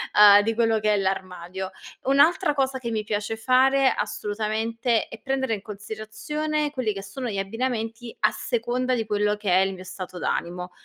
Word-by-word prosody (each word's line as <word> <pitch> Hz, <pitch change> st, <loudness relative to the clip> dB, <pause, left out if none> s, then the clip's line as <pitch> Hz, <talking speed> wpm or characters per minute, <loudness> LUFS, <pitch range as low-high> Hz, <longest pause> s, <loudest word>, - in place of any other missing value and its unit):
uhm, 205 Hz, -1 st, +9 dB
di 225 Hz, +2 st, 0 dB
quello 225 Hz, -1 st, +2 dB
che 215 Hz, 0 st, +2 dB
è -, -, +1 dB
l'armadio. 190 Hz, -1 st, -3 dB, 0.4 s
Un'altra 300 Hz, +4 st, +4 dB
cosa 270 Hz, -1 st, 0 dB
che 240 Hz, -2 st, -4 dB
mi 215 Hz, -1 st, -1 dB
piace 210 Hz, +1 st, -2 dB
fare, 265 Hz, +3 st, +4 dB
assolutamente, 220 Hz, +3 st, -1 dB
è -, -, -11 dB
prendere 265 Hz, -3 st, -1 dB
in 205 Hz, -, -3 dB
considerazione 220 Hz, +9 st, -3 dB
quelli 255 Hz, -6 st, -1 dB
che 195 Hz, 0 st, -7 dB
sono 240 Hz, +6 st, -5 dB
gli 200 Hz, -, -3 dB
abbinamenti 225 Hz, +2 st, -3 dB
a -, -, +4 dB
seconda 255 Hz, -, -1 dB
di 225 Hz, -2 st, -1 dB
quello 210 Hz, 0 st, +1 dB
che 210 Hz, -2 st, -2 dB
è 180 Hz, -, +5 dB
il 195 Hz, 0 st, +1 dB
mio 185 Hz, -, -10 dB
stato 185 Hz, -1 st, -8 dB
d'animo. 180 Hz, +1 st, -3 dB
220 Hz, 175 wpm, -25 LUFS, 200-255 Hz, 0.4 s, uhm